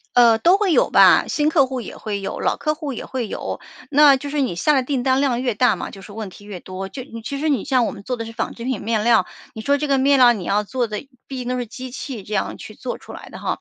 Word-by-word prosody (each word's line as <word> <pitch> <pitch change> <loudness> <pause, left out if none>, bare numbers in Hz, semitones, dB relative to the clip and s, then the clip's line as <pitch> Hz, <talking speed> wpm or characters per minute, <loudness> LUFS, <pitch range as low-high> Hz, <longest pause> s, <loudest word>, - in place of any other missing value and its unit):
呃， 235 -2 +6
都 350 - +5
会 405 -3 +1
有 - - +3
吧， - - +6
新 300 0 +1
客 305 -4 +4
户 260 -1 -4
也 - - -8
会 205 -2 -4
有、 195 - -5
老 - - 0
客 305 -1 -1
户 295 -3 -5
也 235 - -6
会 255 -3 -3
有。 - - -5 0.3
那 290 -1 +7
就 285 +2 -6
是 295 0 -1
你 255 -9 0
下 240 - +2
的 270 -3 +3
订 265 -2 -1
单 260 +1 +2
量 255 -3 +1
越 245 -3 0
大 250 +1 +4
嘛， - - -6
就 195 - -12
是 200 - -12
问 215 -2 -6
题 205 - -15
越 195 -4 -7
多。 190 +2 -6
就 255 +6 -7 0.2
其 280 +5 -4
实 315 - 0
你 275 -8 +1
像 255 -3 +2
我 - - -1
们 200 -1 -11
做 250 - -2
的 230 - -5
是 225 - -8
纺 225 0 -3
织 230 - -10
品 255 -3 -2
面 220 0 0
料， 225 -5 +4 0.3
你 220 - -7
说 280 +6 +2
这 295 +1 -3
个 275 -1 +3
面 275 +1 +4
料 245 -1 +8
你 205 -6 -5
要 205 +3 +1
做 245 +3 -2
得 215 +5 -6 0.2
毕 270 - -7
竟 245 -1 -5
都 250 - -1
是 245 - -3
机 255 +3 -8
器 250 -3 -6
这 205 - -11
样 195 - -1
去 215 - -11
做 255 - -5
出 - - -13
来 - - -10
的 - - -10
哈， - - -2
250 Hz, 325 characters per minute, -21 LUFS, 220-275 Hz, 0.3 s, 料